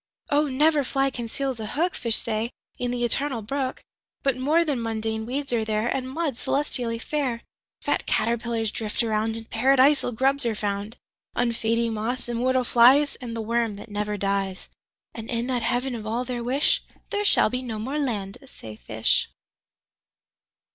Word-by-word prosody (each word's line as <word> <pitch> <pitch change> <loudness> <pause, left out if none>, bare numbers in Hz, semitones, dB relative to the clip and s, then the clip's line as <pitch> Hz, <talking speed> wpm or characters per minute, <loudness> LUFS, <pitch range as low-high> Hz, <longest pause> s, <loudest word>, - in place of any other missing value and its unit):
25Oh! 290 0 +3
never 295 +2 +3
fly 270 +1 +1
conceals 250 +1 -3
a 215 - -4
hook,26Fish 285 -5 0
say, 225 +1 -1 0.3
in 245 - -1
the 245 0 -1
Eternal 260 -1 0
Brook,27But 265 +1 -4
more 310 +6 +3
than 280 -6 -1
mundane 220 0 -2
weeds 275 +1 -3
are 230 -2 +2
there,28And 220 +4 -1
mud, 285 0 -2
celestially 250 -5 0
fair;29Fat 255 -2 -3
caterpillars 230 -1 0
drift 220 +1 -1
around,30And 225 0 -1
Paradisal 270 +3 +4
grubs 270 +4 +1
are 225 - 0
found;31Unfading 225 +2 -2
moths, 225 +4 -3
immortal 250 +2 +1
flies,32And 245 0 +4
the 225 - -2
worm 230 -1 0
that 205 +2 -11
never 210 0 -2
dies.33And 195 +3 -5
in 235 -1 -1
that 250 -1 -1
Heaven 245 +3 0
of 220 -2 -5
all 235 +3 -1
their 245 -1 -3
wish,34There 280 +9 0
shall 400 - +5
be 250 - -2
no 235 -4 -5
more 265 +8 -3
land, 205 -8 -2
say 110 - -10
fish. 110 0 +2
235 Hz, 140 wpm, -25 LUFS, 220-265 Hz, 0.3 s, shall